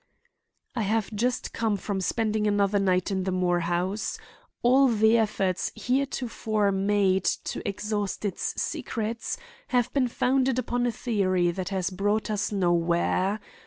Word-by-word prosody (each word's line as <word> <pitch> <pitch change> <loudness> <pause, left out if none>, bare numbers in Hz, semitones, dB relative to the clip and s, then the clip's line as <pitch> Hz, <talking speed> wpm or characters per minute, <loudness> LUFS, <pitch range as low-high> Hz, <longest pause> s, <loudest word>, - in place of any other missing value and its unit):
"I 235 - 0
have 215 +1 0
just 245 +4 -1
come 220 -3 0
from 195 0 -3
spending 215 +1 0
another 205 0 +2
night 185 0 +1
in 190 -1 0
the 190 - -1
Moore 180 -1 +1
house. 175 +5 -1 0.5
All 265 +3 +6
the 220 -1 +4
efforts 200 -5 0
heretofore 240 -5 0
made 195 -1 +2
to - - -1
exhaust 205 0 -3
its 200 - -2
secrets 230 0 -3 0.3
have 245 -2 +1
been 270 -3 +2
founded 255 +1 +1
upon 245 0 0
a - - +1
theory 185 -7 +1
that 185 +2 -4
has 190 -1 -1
brought 205 +3 0
us 205 0 -1
nowhere. 175 +2 +1
205 Hz, 140 wpm, -27 LUFS, 190-225 Hz, 0.5 s, All